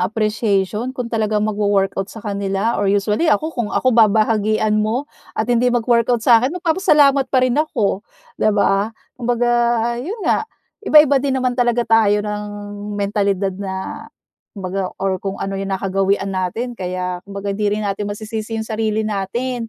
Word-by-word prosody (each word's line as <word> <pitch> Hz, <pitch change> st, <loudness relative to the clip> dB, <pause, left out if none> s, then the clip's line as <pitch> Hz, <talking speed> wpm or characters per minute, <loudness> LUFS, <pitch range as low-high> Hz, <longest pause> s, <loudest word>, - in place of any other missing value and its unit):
appreciation 215 Hz, 0 st, 0 dB
kung 245 Hz, -2 st, -4 dB
talagang 215 Hz, -1 st, +1 dB
magwo-workout 200 Hz, -2 st, 0 dB
sa 220 Hz, -2 st, -11 dB
kanila, 200 Hz, +2 st, -1 dB
or 200 Hz, -, +1 dB
usually 210 Hz, -, +1 dB
ako, 315 Hz, +1 st, +1 dB
kung 235 Hz, -5 st, -2 dB
ako 255 Hz, -1 st, +1 dB
babahagian 215 Hz, -1 st, +3 dB
mo 230 Hz, +6 st, -1 dB, 0.3 s
at 220 Hz, -, +1 dB
hindi 245 Hz, +1 st, +3 dB
mag-workout 235 Hz, -1 st, +1 dB
sa 230 Hz, -2 st, +6 dB
akin, 275 Hz, +8 st, -1 dB
magpapasalamat 300 Hz, -6 st, +3 dB
pa 260 Hz, -, +2 dB
rin 255 Hz, +4 st, +2 dB
ako, 220 Hz, -11 st, -1 dB, 0.4 s
'di -, -, +3 dB
ba? 200 Hz, +1 st, +2 dB, 0.2 s
Kumbaga, 240 Hz, -1 st, 0 dB, 0.5 s
'yon 395 Hz, -, -5 dB
nga, 440 Hz, -, +1 dB, 0.3 s
iba-iba 300 Hz, -7 st, +5 dB
din 270 Hz, -1 st, 0 dB
naman 255 Hz, -1 st, 0 dB
talaga 240 Hz, -1 st, +1 dB
tayo 215 Hz, -2 st, +3 dB
ng 210 Hz, 0 st, -3 dB, 0.5 s
mentalidad 200 Hz, -1 st, 0 dB
na, 190 Hz, -1 st, -5 dB, 0.5 s
kumbaga, 190 Hz, 0 st, -3 dB
or 190 Hz, -1 st, -1 dB
kung 195 Hz, -1 st, -4 dB
ano 195 Hz, 0 st, -4 dB
yung 195 Hz, -, -4 dB
nakagawian 195 Hz, +1 st, 0 dB
natin 190 Hz, +7 st, -2 dB
kaya, 180 Hz, -3 st, -4 dB
kumbaga, 200 Hz, 0 st, -4 dB
hindi 205 Hz, +1 st, 0 dB
rin 215 Hz, -, -3 dB
natin 200 Hz, +1 st, -2 dB
masisisi 215 Hz, +2 st, -5 dB
yung 220 Hz, -, -3 dB
sarili 220 Hz, 0 st, -1 dB
natin. 230 Hz, +4 st, -3 dB
215 Hz, 155 wpm, -19 LUFS, 200-240 Hz, 0.5 s, sa